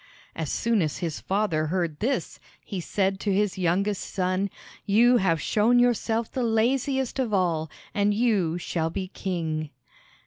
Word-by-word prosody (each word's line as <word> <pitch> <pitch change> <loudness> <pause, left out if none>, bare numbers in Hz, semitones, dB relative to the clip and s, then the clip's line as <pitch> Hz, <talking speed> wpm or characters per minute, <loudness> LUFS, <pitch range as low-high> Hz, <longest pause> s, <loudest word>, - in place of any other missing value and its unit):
As 160 -3 -3
soon 230 -3 +1
as 155 -3 -1
the 170 -3 -2
father 175 -2 -1
heard 170 -3 -1
this, 260 +5 -2 0.3
he 195 - -4
said 190 +2 0
to 205 - -1
his 195 0 +1
youngest 190 +3 +1
son: 185 +1 0 0.4
"You 240 +5 +5
have 170 -6 +2
shown 220 - +3
yourself 235 -2 +1
the 260 - -2
laziest 255 +4 +1
of 230 -6 +1
all, 165 -4 0 0.2
and 205 0 +2
you 205 -7 +1
shall 165 -2 -2
be 185 +2 -4
king." 160 -6 -3
195 Hz, 150 wpm, -26 LUFS, 170-225 Hz, 0.4 s, You